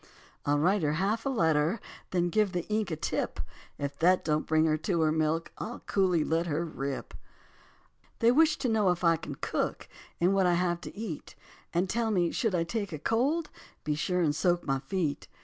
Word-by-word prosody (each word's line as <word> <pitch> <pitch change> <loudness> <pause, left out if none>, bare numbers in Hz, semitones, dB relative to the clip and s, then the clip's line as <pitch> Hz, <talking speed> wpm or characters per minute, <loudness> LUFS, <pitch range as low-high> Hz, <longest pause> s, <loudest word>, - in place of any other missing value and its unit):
I'll 145 0 +3
write 185 +7 +2
her 150 -1 +1
half 205 - 0
a - - +2
letter, 165 - +2 0.3
Then 175 -1 +1
give 210 -2 +2
the 175 -1 -2
ink 215 -1 0
a 160 - -2
tip. 155 - -2 0.4
If 140 0 -4
that 180 +2 +4
don't 155 -1 0
bring 155 0 +3
her 155 -1 +3
to 170 +2 0
her 155 -1 +3
milk 160 +1 0
I'll 240 - -5
coolly 180 -5 +2
let 165 +3 0
her 160 +2 -1
rip. 140 -4 -5 1.0
They 230 +1 +4
wish 310 +3 +4
to 255 - -1
know 215 -4 +3
if 180 0 0
I 165 -1 +5
can 155 -3 -7
cook - - -2 0.3
And 180 +3 +3
what 195 -2 +3
I 175 - +3
have 175 -1 0
to - - -9
eat, 205 -9 -6 0.4
And 175 +2 +1
tell 230 +3 0
me 180 -5 +2
should 225 -6 0
I 170 - +2
take 200 +3 -3
a 155 - -4
cold 275 - 0 0.3
Be 150 - 0
sure 180 +4 0
and 150 -3 +2
soak 175 +2 +1
my 135 -1 0
feet. 150 +1 -2
175 Hz, 205 wpm, -29 LUFS, 155-205 Hz, 1.0 s, I